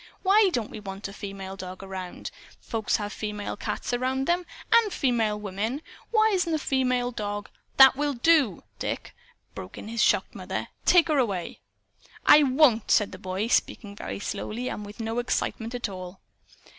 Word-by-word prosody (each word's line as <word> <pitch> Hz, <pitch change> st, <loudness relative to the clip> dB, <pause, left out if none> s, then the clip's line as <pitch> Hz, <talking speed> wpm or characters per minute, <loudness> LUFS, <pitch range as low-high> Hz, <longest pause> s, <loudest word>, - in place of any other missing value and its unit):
"WHY 400 Hz, +1 st, +5 dB
don't 235 Hz, -8 st, -2 dB
we -, -, -7 dB
want 195 Hz, 0 st, -6 dB
a 200 Hz, -, -10 dB
female 195 Hz, -1 st, -7 dB
dog 185 Hz, 0 st, -8 dB
around? 190 Hz, -2 st, -6 dB, 0.3 s
Folks 225 Hz, -2 st, -1 dB
have 205 Hz, -1 st, -3 dB
female 210 Hz, -1 st, -4 dB
cats 225 Hz, -, -4 dB
around 260 Hz, +2 st, 0 dB
them, 350 Hz, +2 st, 0 dB, 0.3 s
and 460 Hz, -3 st, +5 dB
female 225 Hz, -8 st, +1 dB
women. 210 Hz, +8 st, -3 dB, 0.3 s
Why 440 Hz, -1 st, +4 dB
isn't 365 Hz, -5 st, +1 dB
a 315 Hz, -, +2 dB
female 255 Hz, -4 st, 0 dB
dog 205 Hz, -2 st, -4 dB
" -, -, -40 dB
"That 265 Hz, -1 st, +9 dB
will 290 Hz, 0 st, -1 dB
do, 265 Hz, -, +3 dB, 0.2 s
Dick!" -, -, -4 dB, 0.4 s
broke 90 Hz, -, -9 dB
in 215 Hz, -, -8 dB
his 230 Hz, +1 st, -1 dB
shocked -, -, +2 dB
mother. -, -, -5 dB, 0.2 s
"Take 355 Hz, -2 st, +6 dB
her 300 Hz, -3 st, +3 dB
away." 195 Hz, -8 st, -2 dB, 0.7 s
"I 300 Hz, -, +8 dB
won't," 260 Hz, -5 st, +4 dB
said 210 Hz, -, +3 dB
the -, -, -9 dB
boy, 190 Hz, +3 st, -2 dB
speaking 210 Hz, -3 st, 0 dB
very -, -, -5 dB
slowly, 235 Hz, +4 st, -4 dB
and 210 Hz, -, -5 dB
with 205 Hz, +2 st, -11 dB
no 225 Hz, +1 st, -2 dB
excitement 240 Hz, -1 st, -2 dB
at 245 Hz, -, -2 dB
all. 185 Hz, -1 st, -8 dB
230 Hz, 175 wpm, -26 LUFS, 205-270 Hz, 0.7 s, That